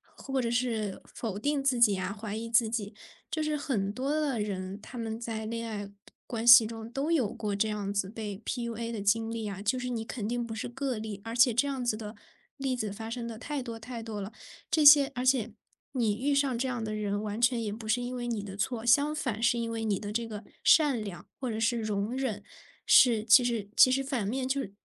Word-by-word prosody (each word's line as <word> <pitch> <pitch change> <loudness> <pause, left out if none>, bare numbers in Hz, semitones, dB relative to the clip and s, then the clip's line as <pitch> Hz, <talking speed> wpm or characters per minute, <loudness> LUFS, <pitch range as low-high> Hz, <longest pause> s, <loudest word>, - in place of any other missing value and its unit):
或 270 -1 -3
者 235 -2 0
是 230 -5 -1
否 210 -4 -4
定 285 +2 0
自 260 -3 +2
己 215 -4 +6
呀， 185 +1 -2
怀 210 0 -6
疑 225 +1 -4
自 230 -1 +3
己。 220 -2 -3 0.4
就 315 - -1
是 305 -1 0
很 235 -10 -1
多 260 +6 -2
的 295 -6 0
人， 195 -1 -4
他 240 +3 -9
们 225 0 -4
在 225 -2 -4
恋 230 +1 -4
爱 205 -2 -5 0.4
关 230 -1 -3
系 235 -2 +10
中 225 0 -7
都 280 +6 -1
有 255 -11 +1
过 205 -2 -3
这 215 +2 +1
样 205 -2 -3
子 200 -1 -1
被 210 -3 -6
PUA 235 -2 -3
的 220 -3 -4
经 225 +3 +1
历 225 -1 -4
呀， 200 -1 -5
就 255 +5 +1
是 250 0 -3
你 225 -2 -3
肯 220 -3 -4
定 240 0 -1
不 225 - -6
是 225 - -4
个 260 -2 -3
例。 210 -2 -6
而 225 +1 -5
且 245 +1 +6
这 245 +5 +2
样 265 -3 -3
子 230 -3 0
的 215 0 -7 0.4
例 270 -2 -1
子 220 -4 -3
发 225 +2 -7
生 235 0 -4
得 225 -1 -7
太 290 -3 -4
多 230 -2 -6
太 230 0 -7
多 215 -2 -5
了， 195 +3 -6 0.4
这 310 -2 +3
些 285 -1 +9
而 250 - -2
且 250 -4 +2 0.4
你 225 -5 +1
遇 280 +3 +1
上 275 -3 +2
这 260 +2 -1
样 245 -3 -3
的 215 0 -3
人 205 -1 -2
完 215 +2 -4
全 240 -1 +3
也 210 -2 -3
不 220 0 -8
是 245 +3 +1
因 250 +1 -4
为 240 -1 -4
你 220 -4 -2
的 195 -1 -7
错， 225 +3 -2
相 285 +5 +4
反 255 -8 -3
是 240 +1 +3
因 230 -1 -2
为 225 0 -3
你 205 -3 0
的 205 -1 -5
这 230 +1 -1
个 210 -1 -7 0.2
善 285 -8 +5
良 195 -4 -8
或 255 -2 -3
者 220 0 -3
是 230 +1 +1
容 210 +2 -2
忍， 225 -7 -2 0.4
是 230 -4 +6
其 240 +3 +7
实 230 -4 -1
其 255 - +7
实 270 +1 +1
反 260 -6 -2
面 255 +4 -2
就 275 +1 0
是 200 -6 -7
230 Hz, 270 characters per minute, -29 LUFS, 215-255 Hz, 0.4 s, 系